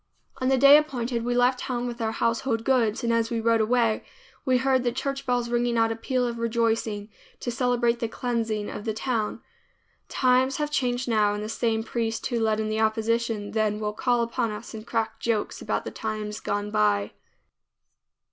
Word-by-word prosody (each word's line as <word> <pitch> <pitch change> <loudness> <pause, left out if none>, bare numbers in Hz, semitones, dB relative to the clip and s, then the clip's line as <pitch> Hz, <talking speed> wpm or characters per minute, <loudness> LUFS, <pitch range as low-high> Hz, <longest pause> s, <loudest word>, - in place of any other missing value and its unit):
On 255 - -1
the 265 - +4
day 280 +3 +9
appointed 245 -6 -1
we 245 +1 -1
left 250 +1 +3
town 245 -2 -3
with 240 -1 -5
our 220 -1 0
household 230 0 0
goods 235 -4 +1
and 235 0 +1
as 230 0 +1
we 235 - -1
rode 230 0 +3
away 230 0 +2 0.4
we 255 -1 +3
heard 260 0 +2
the 240 - +1
church 275 +2 -3
bells 245 -1 +1
ringing 240 0 0
out 225 0 +3
a - - -2
peal 250 +2 -1
of 235 -1 -3
rejoicing 225 -2 0 0.3
to 245 - -3
celebrate 240 -1 +1
the 235 - -1
cleansing 225 -3 -2
of 205 - -7
the 220 -2 -2
town. 225 -2 -2 0.7
Times 255 +1 +2
have 295 0 -2
changed 250 -3 0
now, 210 -3 +2
and 210 - -4
the - - -4
same 225 -1 0
priest 225 0 -2
who 240 -2 -1
led 220 -1 +1
in 215 - -1
the 215 0 -1
opposition 220 -1 0
then 215 -1 +1
will 210 -1 -2
call 240 +2 +1
upon 235 0 -1
us 210 +3 -7
and 220 +1 -8
crack 225 -2 -2
jokes 225 -3 -1
about - - -2
the - - -4
times 215 -1 -4
gone 205 0 -2
by. 105 - +2
230 Hz, 195 wpm, -26 LUFS, 220-245 Hz, 0.7 s, day